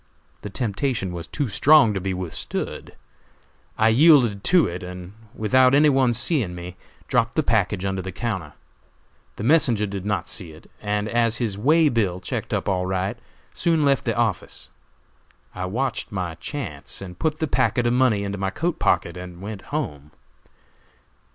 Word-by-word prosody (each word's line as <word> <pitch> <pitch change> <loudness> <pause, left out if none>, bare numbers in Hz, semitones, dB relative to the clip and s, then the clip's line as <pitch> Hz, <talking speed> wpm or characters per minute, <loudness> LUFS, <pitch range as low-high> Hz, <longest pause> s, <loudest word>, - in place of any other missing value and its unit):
The 105 - -6
temptation 110 -1 -2
was 85 -1 -6
too 145 -4 -2
strong 115 +3 +5
to 95 - -3
be 95 +1 -2
withstood. 90 -3 -4 0.8
I 110 +1 +4
yielded 120 -6 +5
to 180 -2 +5
it, 90 +1 -4
and 90 +1 -8 0.2
without 130 +4 +4
any 150 +1 +6
one's 130 -4 +2
seeing 120 - 0
me, 90 +1 -8 0.3
dropped 115 0 +1
the 155 - +2
package 105 -5 +1
under 95 -1 -1
the 95 +1 -6
counter. 95 -8 -4 0.8
The - - -6
messenger 120 -6 +3
did 100 -2 -5
not 100 -4 -2
see 90 -7 -5
it, 80 - -17
and 105 0 -1
as 115 0 +1
his 110 -5 -2
way 155 +10 +4
bill 105 -9 0
checked - - -5
up - - -1
all 90 -2 0
right, 95 +5 -2 0.3
soon 165 -3 +1
left 140 -1 +2
the 115 -1 -1
office. 110 -6 -2 0.8
I 90 0 -4
watched 125 +6 -2
my 90 -4 -3
chance 85 - -6
and 90 -2 -10
put 155 -1 0
the 160 - -1
packet 125 -4 +1
of 120 - +2
money 125 -5 +3
into 100 0 -4
my 95 -1 0
coat 165 - -2
pocket 85 0 +1
and 90 -1 -9
went 100 +1 -7
home. 75 0 -4
105 Hz, 170 wpm, -23 LUFS, 90-130 Hz, 0.8 s, any